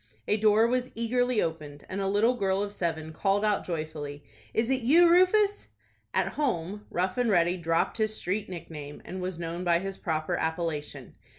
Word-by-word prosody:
A - - +3
door 215 +1 +4
was 250 +1 0
eagerly 245 0 +1
opened, 150 -3 -5
and 195 +1 -4
a 195 - 0
little 210 +5 +3
girl 195 -4 0
of 205 0 -5
seven 160 -4 -3
called 200 +4 +1
out 210 -1 +1
joyfully:— 155 -3 -5 0.3
"Is 230 +3 0
it 260 -1 +1
you, 325 +9 +6
Rufus?" 395 +4 +4 0.4
At - - +1
home, 210 - -2
Rough 185 +6 -1
and 245 -2 +2
Ready 175 -3 +3
dropped 165 +4 0
his 215 0 0
street 200 +3 -2
nickname, 150 -5 -8
and 185 0 -6
was 180 -1 -3
known 170 +1 -4
by 170 -1 +3
his 195 +2 -5
proper 155 -2 -1
appellation. 160 -2 -3
190 Hz, 180 wpm, -28 LUFS, 165-225 Hz, 0.4 s, you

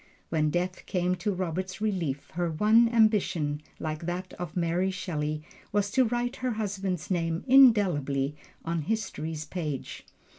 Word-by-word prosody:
When 155 -2 +2
death 180 +3 -2
came 180 -1 +1
to 190 +4 -1
Robert's 185 0 -3
relief, 175 -10 -2
her 175 0 -1
one 215 +8 +4
ambition, 200 -10 +2 0.2
like 155 +1 -4
that 180 +1 -4
of 175 -1 -5
Mary 175 +2 +1
Shelley, 155 -5 -3 0.3
was 205 -1 +1
to 260 +3 +4
write 245 +2 -1
her 255 -2 -1
husband's 195 -5 -3
name 165 -2 0
indelibly 180 - +5 0.3
on 165 0 -1
history's 160 -5 -3
page. 150 -5 -5
180 Hz, 140 wpm, -28 LUFS, 155-210 Hz, 0.3 s, indelibly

